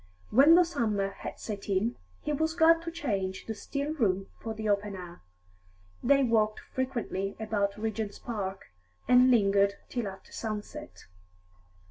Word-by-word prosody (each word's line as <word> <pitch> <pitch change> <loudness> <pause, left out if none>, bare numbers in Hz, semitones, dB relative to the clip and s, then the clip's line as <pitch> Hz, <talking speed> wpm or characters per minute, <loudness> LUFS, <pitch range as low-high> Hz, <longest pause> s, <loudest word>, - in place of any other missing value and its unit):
When 280 +8 +7
the 360 - +7
summer 215 - 0
had - - -7
set 205 -2 -6
in, 205 +5 +1 0.3
he 300 - -1
was 315 +2 0
glad 330 0 +5
to 335 0 -5
change 200 - -3
the 225 - -3
still 280 +7 -3
room 195 -9 0
for 225 -1 -5
the 215 0 -4
open 205 0 0
air; 175 -2 -9 0.8
they 275 -1 +4
walked 215 -3 +2
frequently 235 -7 -2
about 205 -2 -1
Regent's 220 -1 -3
Park, 195 - -5 0.4
and 250 +1 +6
lingered 200 -4 +4
till 240 -4 -2
after 190 0 -10
sunset. 205 - -6
220 Hz, 145 wpm, -29 LUFS, 200-260 Hz, 0.8 s, When